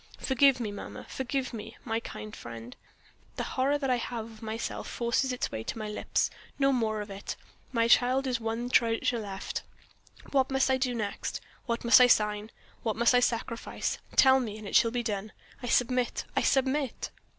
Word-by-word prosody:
Forgive 265 0 +4
me, 220 -4 -2
mamma; 205 - -8
forgive 265 0 -3
me, 225 +1 -7
my 225 -1 0
kind 105 - -8
friend 115 +1 -9 0.6
the - - -2
horror 275 +3 +1
that 270 -3 -1
I 250 - +3
have 235 -1 -4
of 225 -1 -13
myself 220 +1 -4
forces 240 +2 0
its 250 - -2
way 110 - -4
to - - -4
my 215 -1 -4
lips. 210 - 0 0.3
No 275 -1 +3
more 220 -4 0
of 205 -1 -7
it! 195 0 -5 0.4
My 230 -2 +2
child 250 +3 +4
is 250 -3 0
my 225 - -10
one 235 +2 -2
treasure 230 0 +2
left. 195 -3 -4 0.7
What 265 -2 +3
must 270 0 +2
I 260 - +3
do 255 -1 0
next? 210 -3 -3 0.3
What 235 0 -1
must 235 +1 +8
I 250 - +8
sign? 210 -2 +2 0.3
What 220 -3 -1
must 235 +2 +4
I 245 - +6
sacrifice? 230 -1 -1 0.2
Tell 265 -1 +7
me 220 -4 -4
and 215 -1 -8
it - - -4
shall 230 - +6
be 240 +1 -2
done. 210 -1 -3 0.3
I 245 - -5
submit! 245 +1 +1
I - - +3
submit!" 270 -1 +1
235 Hz, 195 wpm, -29 LUFS, 220-255 Hz, 0.7 s, must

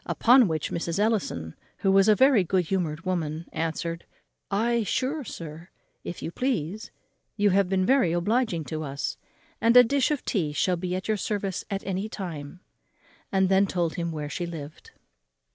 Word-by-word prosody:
Upon 245 -1 +5
which 155 -3 -2
Mrs. 170 0 -2
Ellison, 200 - 0 0.2
who 195 - +1
was 195 +1 +5
a 215 - +6
very 260 -4 +5
good 180 0 +1
humoured 170 -2 -2
woman, 165 -3 -2
answered, 165 +1 -3 0.4
"Ay, 235 +4 +1
sure, 270 - -1
sir, 165 -4 -8 0.3
if 175 - -6
you - - -4
please; 215 - -2 0.5
you 205 -1 +3
have 195 0 +2
been 185 -1 +1
very 255 -8 +3
obliging 185 0 0
to 155 +1 -5
us; 140 -2 -4 0.4
and 230 +2 +5
a 250 - +11
dish 270 +2 +1
of 300 -3 -2
tea 160 -9 -1
shall 180 +4 +1
be 180 +1 -3
at 185 - -4
your 215 -1 +1
service 200 -3 -2
at 195 -1 -4
any 195 +2 -2
time;" 170 -5 -7 0.7
and 190 -1 +3
then 195 +1 +4
told 175 -3 -1
him 170 -1 -3
where 150 -2 -4
she 175 +4 -4
lived. 155 -3 -9
185 Hz, 175 wpm, -26 LUFS, 165-215 Hz, 0.7 s, a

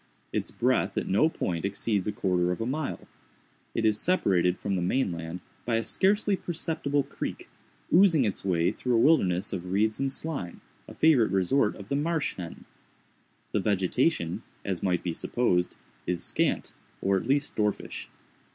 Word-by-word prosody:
Its - - -1
breadth - - 0
at - - -1
no 105 +12 +3
point 85 - -3
exceeds 100 0 0
a - - +1
quarter 90 -3 +1
of 90 - -3
a 115 - -1
mile. 140 +3 -3 0.7
It 115 - +1
is 110 -1 +3
separated 95 - +2
from 100 - -2
the 90 - -1
main 95 +4 +1
land 85 +1 -6 0.2
by 120 - 0
a 115 - +1
scarcely 200 - +2
perceptible 155 -5 -1
creek, 140 - -6 0.4
oozing 170 -7 +6
its 105 - -2
way 85 -3 +2
through 125 -1 -1
a - - +4
wilderness 100 - +3
of 90 0 -4
reeds 105 +3 +1
and 135 0 0
slime, 140 - -4 0.3
a - - -11
favorite 145 -8 +4
resort 95 +5 +2
of 100 -1 -11
the 140 - 0
marsh 160 +1 0
hen. 85 -3 -8 0.9
The - - +1
vegetation, 100 - +1 0.2
as 95 -3 -2
might 90 -2 0
be 85 - -2
supposed, 90 -3 0 0.3
is 90 -1 0
scant, - - 0 0.3
or 95 0 +1
at 95 - -1
least 140 +2 +1
dwarfish. 105 -1 -2
105 Hz, 170 wpm, -28 LUFS, 90-140 Hz, 0.9 s, oozing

